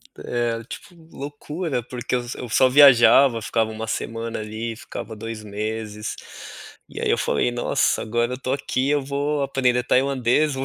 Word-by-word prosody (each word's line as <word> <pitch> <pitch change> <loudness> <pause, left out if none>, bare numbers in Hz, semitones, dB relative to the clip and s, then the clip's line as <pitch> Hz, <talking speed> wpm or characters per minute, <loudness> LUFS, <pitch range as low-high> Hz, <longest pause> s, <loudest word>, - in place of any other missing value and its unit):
É, 120 -1 -2
tipo 175 - -10 0.2
loucura 145 +1 -4
porque 125 +1 -6
eu 125 - 0 0.2
eu 125 - -6
só 130 +3 +4
viajava, 135 -2 +7
ficava 110 +1 0
uma 110 0 -6
semana 115 0 -4
ali, 110 +2 -5
ficava 110 0 -8
2 110 0 -7
meses, 105 +1 -4 0.7
e - - -8
aí - - 0
eu - - +3
falei: 95 - +1
"Nossa, 120 0 0
agora 120 +2 -1
eu 125 - -4
tô 130 0 -2
aqui 135 -1 -1
eu 145 -1 +2
vou 140 +2 -2
aprender 130 -3 +1
tailandês, 135 +3 +2
eu - - -5
120 Hz, 165 wpm, -23 LUFS, 115-135 Hz, 0.7 s, viajava